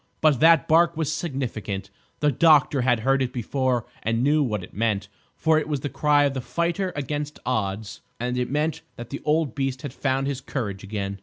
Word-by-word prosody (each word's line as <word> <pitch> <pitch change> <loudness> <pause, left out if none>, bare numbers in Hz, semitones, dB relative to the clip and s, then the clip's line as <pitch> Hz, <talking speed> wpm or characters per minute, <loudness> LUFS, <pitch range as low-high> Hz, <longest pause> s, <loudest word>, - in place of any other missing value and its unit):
But 150 -5 +3
that 165 +2 +5
bark 170 0 +4
was 155 -1 0
significant; 120 - -4 0.3
the 150 -1 +3
doctor 145 -1 +4
had 120 -2 +2
heard 135 +3 +2
it 125 -2 0
before 125 -1 -1 0.2
and 115 +2 0
knew 150 +2 +3
what 105 -8 -1
it - - -12
meant: 105 -2 0 0.3
for 160 -1 +3
it 155 - -4
was 145 -3 -2
the 145 - -3
cry 145 0 +3
of 140 -1 +1
the 130 - -3
fighter 170 +7 -1
against 145 +1 -3
odds 105 -3 -2 0.2
and 125 +1 -2
it 125 0 -1
meant 150 +3 -1
that 120 -1 -9
the 140 - -5
old 150 -4 +1
beast 135 -2 -2
had 140 -4 -5
found 135 -1 0
his 135 -2 -3
courage 105 -8 -4
again. 100 -1 -4
135 Hz, 205 wpm, -24 LUFS, 115-150 Hz, 0.3 s, that